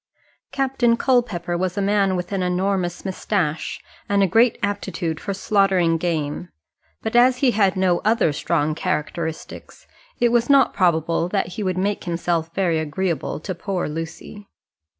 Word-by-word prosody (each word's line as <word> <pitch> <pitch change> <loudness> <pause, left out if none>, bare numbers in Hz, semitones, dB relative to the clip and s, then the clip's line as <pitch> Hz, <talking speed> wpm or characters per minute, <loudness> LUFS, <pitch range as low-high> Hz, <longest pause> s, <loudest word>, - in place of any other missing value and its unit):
Captain 260 -3 +1
Culpepper 235 -10 0
was 185 +2 -2
a - - +1
man 200 -1 +2
with 180 +2 -4
an 195 -2 -1
enormous 180 0 -1
moustache, 185 -4 -2 0.3
and 200 -1 +3
a - - +3
great 225 +5 +3
aptitude 190 -5 -2
for 200 - -4
slaughtering 190 -4 +2
game; 165 -1 -2 0.5
but 220 - -3
as 250 +1 +5
he 255 -1 +3
had 195 -4 +2
no 185 -2 +2
other 215 -7 +2
strong 150 +1 0
characteristics, 160 -1 -4 0.3
it 240 - +4
was 240 +1 +1
not 275 -1 +5
probable 170 -2 +1
that 195 -2 -1
he 185 +4 -6
would 185 -2 -1
make 200 +2 -1
himself 170 -1 -1
very 175 -4 +1
agreeable 160 +2 -2
to 185 - -5
poor 185 0 -3
Lucy. 165 +6 -7
185 Hz, 150 wpm, -22 LUFS, 170-205 Hz, 0.5 s, as